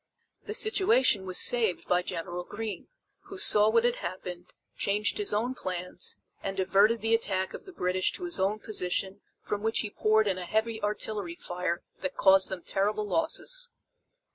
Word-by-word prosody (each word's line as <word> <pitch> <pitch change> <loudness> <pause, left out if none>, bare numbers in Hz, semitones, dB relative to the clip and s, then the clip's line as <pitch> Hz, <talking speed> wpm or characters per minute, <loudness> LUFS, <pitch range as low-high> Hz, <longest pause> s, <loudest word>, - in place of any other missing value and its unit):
The 430 - -2
situation 370 - +4
was 185 - -1
saved 225 -7 +2
by 180 0 +3
General 175 0 -5
Greene, 210 +1 -6 0.4
who 390 - -9
saw 215 - +5
what 230 +1 +3
had 240 0 +1
happened, 180 -1 -7 0.2
changed 205 - 0
his 415 - +1
own 235 +5 0
plans 180 -5 -5 0.2
and 195 0 -4
diverted 200 +4 +3
the 225 +1 +1
attack 190 -4 0
of - - -9
the 380 - -11
British 185 - 0
to - - -8
his 345 -1 0
own 195 +3 +1
position 195 -2 -2 0.2
from 205 - -3
which 225 +1 +1
he 210 - -4
poured 215 +1 +2
in 190 -2 0
a 180 - -5
heavy 220 +4 -1
artillery 205 -3 -3
fire 175 0 -3 0.2
that 280 - -4
caused 190 0 +5
them 185 -3 -5
terrible 210 +2 0
losses. 475 - -1
205 Hz, 170 wpm, -28 LUFS, 185-230 Hz, 0.4 s, saw